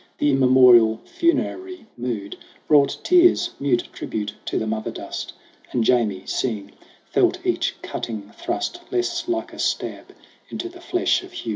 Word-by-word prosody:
The 145 Hz, -, +2 dB
immemorial 125 Hz, -4 st, +6 dB
funerary 365 Hz, 0 st, -1 dB
mood 115 Hz, -5 st, -4 dB, 0.3 s
Brought 145 Hz, -2 st, +4 dB
tears, 355 Hz, 0 st, +4 dB
mute 135 Hz, -4 st, +1 dB
tribute 105 Hz, -1 st, -4 dB
to -, -, -2 dB
the 110 Hz, -, -1 dB
mother 110 Hz, 0 st, -2 dB
dust; -, -, -6 dB, 0.4 s
And 120 Hz, -, +1 dB
Jamie, 110 Hz, -6 st, +2 dB
seeing, 105 Hz, -5 st, -2 dB, 0.4 s
felt -, -, +3 dB
each -, -, 0 dB
cutting 105 Hz, -3 st, -5 dB
thrust 350 Hz, +1 st, -3 dB
Less 355 Hz, -2 st, -1 dB
like 340 Hz, -1 st, -2 dB
a -, -, -11 dB
stab -, -, -2 dB, 0.4 s
into 355 Hz, -, -5 dB
the 350 Hz, 0 st, -14 dB
flesh 355 Hz, 0 st, +1 dB
of 370 Hz, 0 st, -13 dB
Hugh. 115 Hz, -, -6 dB
130 Hz, 145 wpm, -23 LUFS, -, 0.4 s, immemorial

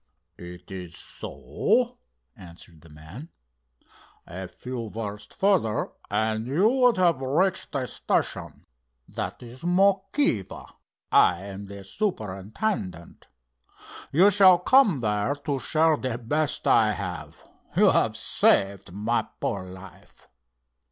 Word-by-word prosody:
"It 90 Hz, +1 st, -11 dB
is 90 Hz, -3 st, -8 dB
so?" -, -, -2 dB, 0.4 s
answered 85 Hz, -2 st, -14 dB
the 85 Hz, -, -17 dB
man. 80 Hz, -, -11 dB, 1.0 s
"A 95 Hz, +2 st, -7 dB
few 120 Hz, +2 st, -7 dB
versts 105 Hz, -1 st, -7 dB
further, 185 Hz, -, +1 dB, 0.2 s
and 110 Hz, +2 st, -1 dB
you 165 Hz, +11 st, +3 dB
would 250 Hz, -2 st, +3 dB
have 170 Hz, -7 st, +2 dB
reached 165 Hz, +9 st, 0 dB
the 135 Hz, -3 st, -1 dB
station. -, -, -2 dB, 0.4 s
That -, -, -5 dB
is 120 Hz, +2 st, -11 dB
Mokiva. 190 Hz, -, +1 dB, 0.4 s
I 90 Hz, +1 st, +4 dB
am 100 Hz, 0 st, -8 dB
the 100 Hz, 0 st, -9 dB
superintendent. 100 Hz, -, -4 dB, 0.8 s
You 185 Hz, +7 st, +5 dB
shall 190 Hz, -2 st, +7 dB
come 195 Hz, -, +4 dB
there 105 Hz, +4 st, 0 dB
to 145 Hz, -1 st, -3 dB
share 160 Hz, +2 st, +2 dB
the 130 Hz, -4 st, -3 dB
best 145 Hz, +5 st, -1 dB
I 110 Hz, -1 st, +4 dB
have. 90 Hz, -4 st, -7 dB, 0.3 s
You -, -, +6 dB
have -, -, +1 dB
saved 100 Hz, -2 st, +1 dB
my 105 Hz, +5 st, -1 dB
poor 95 Hz, -2 st, -3 dB
life." 95 Hz, -1 st, -14 dB
115 Hz, 115 wpm, -25 LUFS, -, 1.0 s, shall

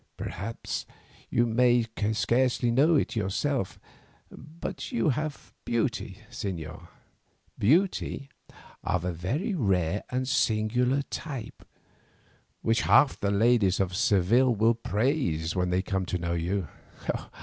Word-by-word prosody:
Perhaps 105 Hz, +6 st, -5 dB, 0.4 s
you 120 Hz, -, +2 dB
may 120 Hz, 0 st, +3 dB, 0.3 s
scarcely 120 Hz, +3 st, +2 dB
know 145 Hz, +7 st, +4 dB
it 140 Hz, -, +1 dB
yourself, 105 Hz, +3 st, -1 dB, 0.5 s
but 155 Hz, -, -7 dB
you 235 Hz, -10 st, +1 dB
have 150 Hz, +2 st, -3 dB
beauty, 115 Hz, -1 st, -1 dB
señor, 80 Hz, -6 st, -5 dB, 0.7 s
beauty 155 Hz, -, +2 dB, 0.6 s
of 90 Hz, -1 st, -1 dB
a 90 Hz, -, -1 dB
very 125 Hz, -, -2 dB
rare 95 Hz, -, +1 dB
and 130 Hz, 0 st, -1 dB
singular 125 Hz, +3 st, +1 dB
type, 135 Hz, -7 st, -6 dB, 1.0 s
which 115 Hz, 0 st, +2 dB
half 125 Hz, -, +4 dB
the 100 Hz, -, 0 dB
ladies 100 Hz, -2 st, +3 dB
of 95 Hz, -2 st, 0 dB
Seville 120 Hz, +3 st, +3 dB
will 110 Hz, +2 st, +4 dB
praise 105 Hz, -, -1 dB
when 90 Hz, -1 st, +1 dB
they 90 Hz, +1 st, +1 dB
come 95 Hz, -2 st, -2 dB
to 90 Hz, -, -1 dB
know 85 Hz, -1 st, -2 dB
you." 85 Hz, +2 st, -1 dB
115 Hz, 115 wpm, -28 LUFS, 95-130 Hz, 1.0 s, know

